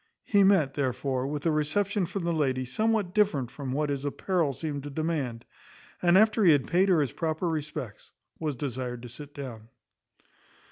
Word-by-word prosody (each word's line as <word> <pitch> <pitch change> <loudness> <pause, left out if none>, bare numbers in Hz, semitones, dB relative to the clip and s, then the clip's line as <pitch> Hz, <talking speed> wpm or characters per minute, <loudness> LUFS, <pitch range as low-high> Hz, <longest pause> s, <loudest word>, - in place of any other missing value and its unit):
He 200 -2 +4
met, 185 -9 +4
therefore, 130 -1 -1
with 145 +1 -4
a 165 - +3
reception 180 +6 0
from 185 +1 -4
the 170 0 0
lady 130 -5 0
somewhat 215 - 0
different 160 - +2
from 135 -3 -5
what 145 +2 0
his 140 -1 -3
apparel 160 +2 0
seemed 145 +1 -4
to 145 - -7
demand; 140 -6 -2 0.6
and 175 +1 +5
after 215 +1 +4
he 170 -5 +7
had 140 -3 +2
paid 185 +3 +3
her 170 -5 +4
his 140 - -1
proper 160 +2 -2
respects, 150 -9 -5 0.3
was 155 -3 -2
desired 125 -2 -4
to 120 - -8
sit 145 +4 -9
down. 115 -6 -8
150 Hz, 180 wpm, -28 LUFS, 130-175 Hz, 0.6 s, he